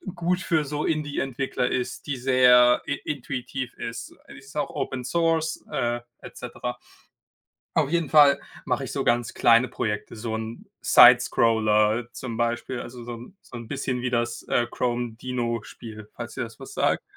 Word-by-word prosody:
gut 180 +2 0
für 160 -4 +1
so 150 +1 -3
Indie 150 -2 -1
Entwickler 130 -1 -1
ist, 125 +3 -3
die 140 - -1
sehr 125 -1 +5
in 145 - -2
intuitiv 130 -2 -4
ist. 115 0 -7
Die - - -11
ist 135 +2 -15
auch 145 -2 -1
Open 130 -1 -4
Source, 165 +1 0
äh, 120 0 -1 0.2
et - - -11
cetera. - - -6 1.0
Auf 155 -4 +2
jeden 170 -4 0
Fall 145 -2 +6 0.3
mache - - -1
ich - - -7
so - - -2
ganz 120 0 +1
kleine 115 +2 +5
Projekte, 105 0 -3
so 110 0 -4
'n 110 +1 -6 0.2
Sidescroller 110 0 +5
zum 115 -3 -6
Beispiel, 120 +1 -1
also 120 0 -9
so 120 0 -6
'n 125 - -13
so - - -13
'n 115 -1 -9
bisschen 130 -2 -3
wie 125 - -1
das, 120 -1 -1
äh, 120 - +2
Chrome 120 -2 -1
Dino-Spiel, 115 -3 -5
falls - - -7
dir - - -3
das - - -10
was - - -10
sagt. - - +1
125 Hz, 170 wpm, -25 LUFS, 115-140 Hz, 1.0 s, Fall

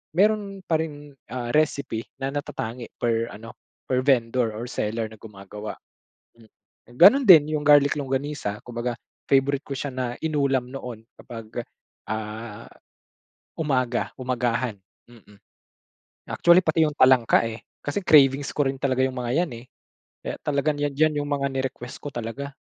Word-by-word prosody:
meron 200 -1 +1
pa 160 -2 +1
rin, 145 -2 -7 0.2
ah, 120 -1 -4
recipe 140 -6 0
na 135 0 -1
natatangi 120 -4 -5
per 115 -1 0
ano 115 +2 -10 0.3
per 130 -1 +1
vendor 115 -3 +2
or 115 +3 -5
seller 110 +1 -2
na 110 - -14
gumagawa 105 0 -9 0.6
hmm. 110 -2 -20 0.5
Gano'n 235 +11 +8
din 155 -6 +7
'yung 150 - -1
garlic 145 -1 +6
longganisa 135 -5 -3
kumbaga 120 0 -4 0.3
favorite 140 +1 +3
ko 140 - -6
siya 145 - -3
na 125 -2 -2
inulam 140 -5 +1
noon, 125 -4 -7 0.2
kapag, 115 0 -7 0.5
ah, 110 0 -5 0.9
umaga 130 -6 0
umagahan 125 -2 -1 0.4
mm. 105 -4 -18 0.9
Actually 170 +1 +5
pati 160 0 +2
'yung 150 - -5
talangka, 130 -3 +5
eh, 110 0 -8 0.2
kasi 145 +8 -2
cravings 140 -4 +5
ko 145 -2 +2
rin 135 - -2
talaga 130 -2 0
'yung 130 0 -3
mga 120 -1 -2
yan, 160 - -6
eh. - - -19 0.6
Kaya - - -4
talagang 145 +1 0
'yan 145 -1 -1
'yan 155 0 +3
'yung 145 - -5
mga 140 -1 0
ni-request 130 -2 -4
ko 145 - -5
talaga. 130 +5 -5
130 Hz, 150 wpm, -24 LUFS, 115-145 Hz, 0.9 s, Gano'n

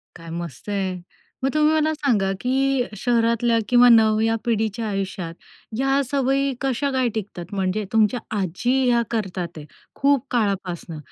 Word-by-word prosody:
काय 165 -1 -11
मस्त 170 +2 -8
आहे. 190 -2 -1 0.5
मग 270 - +2
तुम्ही 305 0 +3
मला 315 0 +2
सांगा, 225 -11 +1
की 265 +1 +1
शहरातल्या 230 +1 +2
किंवा 245 0 +7
नव्या 225 0 +4
पिढीच्या 225 -1 -1
आयुष्यात 195 -4 -3 0.4
ह्या 270 +1 +2
सवयी 275 +1 0
कशा 270 +1 0
काय 260 -2 +1
टिकतात? 190 -5 -5
म्हणजे 190 +2 -1
तुमच्या 220 +2 +3 0.2
आजी 190 +6 -1 0.2
ह्या 235 -1 +3
करतात 190 -6 -2
आहे, 150 - -8 0.3
खूप 280 -2 +2
काळापासनं. 190 -7 -2
230 Hz, 140 wpm, -22 LUFS, 195-265 Hz, 0.5 s, किंवा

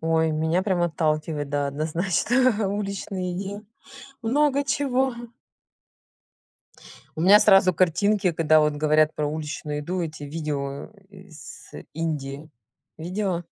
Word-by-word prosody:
Ой, 160 0 +1
меня 160 +4 0
прям 185 -3 0
отталкивает, 155 -3 -1
да, 145 0 -1
однозначно, 195 - +1
уличные 195 -2 -4
еде 200 +2 -5 0.6
много 280 +4 +2
чего. 265 -2 0 2.0
У - - -4
меня 200 +5 +7
сразу 195 -3 +5
картинки, 190 +3 +2
когда 155 -1 +3
вот 150 -1 +1
говорят 155 +1 +2
про 150 - -1
уличную 150 -1 -4
еду- 180 +5 -3
эти 155 -2 -6
видео, 145 -1 -4 0.2
э, 190 -1 -15
с 155 -4 -13 0.2
Индии. 150 -2 -4 0.5
Видела? 180 +1 -2
165 Hz, 115 wpm, -24 LUFS, 155-200 Hz, 2.0 s, меня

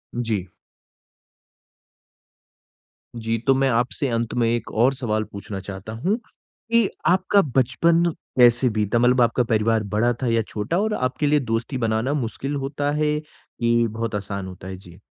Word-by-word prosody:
जी। 110 -6 -2 2.7
जी, 115 0 -1
तो 135 - +6
मैं 135 0 +2
आपसे 125 +3 0
अंत 115 -1 -1
में 120 -2 +1
एक 120 0 -2
और 125 +5 +3
सवाल 110 -4 -1
पूछना 100 -1 -7
चाहता 95 +2 -8
हूँ, 185 - 0
की 230 -1 -2 0.2
आपका 190 +2 +4
बचपन 150 +7 +3 0.4
कैसे 120 +1 +6
बीता? 110 +1 0
मतलब 125 +1 +4
आपका 120 +1 +3
परिवार 110 0 +1
बड़ा 120 +3 +3
था - - +1
या 115 -1 +2
छोटा 105 - -2
और 215 +1 0
आपके 130 +1 -1
लिए 150 +1 +4
दोस्ती 120 +1 -2
बनाना 115 +3 0
मुश्किल 135 +1 -3
होता 140 +1 -2
है, 150 0 +1
कि 120 -6 -1
बहुत 110 0 -3
आसान 100 -1 -4
होता 95 0 -10
है? 95 0 -6
जी। 90 -1 -15
120 Hz, 155 wpm, -23 LUFS, 110-135 Hz, 2.7 s, तो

